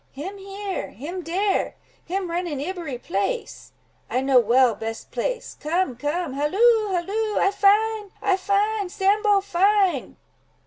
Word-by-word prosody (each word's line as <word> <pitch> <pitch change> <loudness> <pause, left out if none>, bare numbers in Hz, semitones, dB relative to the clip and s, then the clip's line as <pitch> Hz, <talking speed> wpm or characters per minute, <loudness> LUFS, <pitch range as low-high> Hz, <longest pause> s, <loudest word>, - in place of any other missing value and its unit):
"Him 375 +9 -7
here—him 385 - -5
dere—him 375 0 -2
run 350 +1 -1
in 295 -5 -4
ibbery 325 -4 -4
place; 240 - -3 0.4
I 255 - 0
know 265 -1 +5
well 240 +1 +4
best 225 +2 -6
place. - - -3
Come, 315 -3 0
come—halloo, 350 - +1
halloo! 410 +5 -1
I 390 - +3
find! 415 +1 +3
I 400 -3 +2
find! 400 0 0
Sambo 405 +1 +3
find!" 385 -4 +2
375 Hz, 120 wpm, -24 LUFS, 295-405 Hz, 0.4 s, know